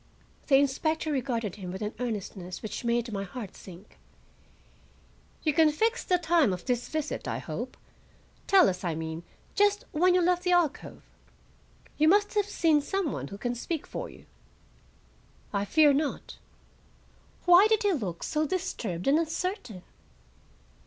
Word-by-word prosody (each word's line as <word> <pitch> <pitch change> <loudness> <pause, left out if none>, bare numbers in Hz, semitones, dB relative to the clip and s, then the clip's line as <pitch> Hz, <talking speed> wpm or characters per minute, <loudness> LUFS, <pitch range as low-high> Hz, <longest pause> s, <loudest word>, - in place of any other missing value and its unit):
The 275 - +5
inspector 310 +3 +1
regarded 235 -7 -2
him 185 -3 -6
with 190 +3 -5
an 210 - -3
earnestness 200 -6 -5
which 215 +2 -5
made 235 0 0
my 195 -1 -2
heart 200 +1 -8
sink. 185 +2 -14 1.4
"You 305 - +2
can 315 +1 +5
fix 450 +9 0
the 365 - +2
time 335 - +3
of 180 - -7
this 245 -1 -1
visit, 310 -1 -3
I - - -2
hope; - - -6 0.7
tell 385 -3 +6
us, 180 0 -2
I 170 -3 -1
mean, 160 0 -5 0.3
just 410 0 +2
when 360 +4 +3
you 365 - +4
left 355 0 +2
the 360 0 +1
alcove. 335 -5 0 1.0
You 310 - +5
must 410 +4 +4
have 415 -1 +1
seen 320 -6 +3
some 370 +1 -1
one 135 - -5
who 200 - -8
can 240 +4 -2
speak 300 +6 -4
for - - -6
you." - - -15 1.3
"I 200 0 0
fear 300 +6 +5
not." 290 +1 -3 1.1
Why 355 +4 +8
did 440 0 +2
he 405 -2 +3
look 195 - -4
so 305 0 0
disturbed 220 - -3
and 290 +3 +5
uncertain? 325 - -3
290 Hz, 155 wpm, -28 LUFS, -, 1.4 s, Why